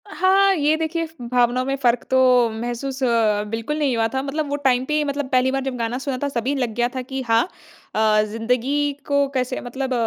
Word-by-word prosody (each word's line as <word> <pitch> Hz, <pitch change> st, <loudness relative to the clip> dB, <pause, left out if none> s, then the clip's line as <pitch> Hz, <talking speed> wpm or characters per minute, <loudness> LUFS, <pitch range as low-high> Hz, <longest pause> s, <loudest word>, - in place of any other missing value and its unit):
हाँ, 390 Hz, +1 st, +3 dB
ये 300 Hz, -1 st, +2 dB
देखिए 325 Hz, +1 st, -2 dB
फ़ 320 Hz, -3 st, -15 dB
भावना 245 Hz, 0 st, +2 dB
में 270 Hz, +1 st, -1 dB
फ़र्क 245 Hz, -2 st, +2 dB
तो 255 Hz, -2 st, +4 dB
महसूस 240 Hz, +4 st, -4 dB, 0.5 s
बिल्कुल 230 Hz, +7 st, -3 dB
नहीं 280 Hz, -5 st, +1 dB
हुआ 225 Hz, 0 st, +2 dB
था 265 Hz, -, 0 dB
मतलब 290 Hz, +2 st, -3 dB
वो 285 Hz, -, -1 dB
टाइम 255 Hz, -1 st, +3 dB
पे 300 Hz, -, -3 dB
ही 305 Hz, 0 st, +2 dB
मतलब 285 Hz, -1 st, -2 dB
पहली 255 Hz, 0 st, +3 dB
बार 270 Hz, 0 st, -1 dB
जब 265 Hz, -1 st, -3 dB
गाना 230 Hz, +1 st, -2 dB
सुना 265 Hz, 0 st, -3 dB
था -, -, +1 dB
सभी 260 Hz, +2 st, -1 dB
लग 250 Hz, -5 st, -1 dB
गया 240 Hz, 0 st, +2 dB
था 260 Hz, -, -2 dB
कि 265 Hz, +1 st, -5 dB
हाँ, 230 Hz, 0 st, +4 dB, 0.5 s
अ, 215 Hz, -1 st, +3 dB
ज़िंदगी 250 Hz, +7 st, 0 dB, 0.2 s
को 280 Hz, -1 st, +2 dB
कैसे 255 Hz, -1 st, -2 dB
मतलब 260 Hz, +2 st, -4 dB
260 Hz, 215 wpm, -22 LUFS, 240-285 Hz, 0.5 s, तो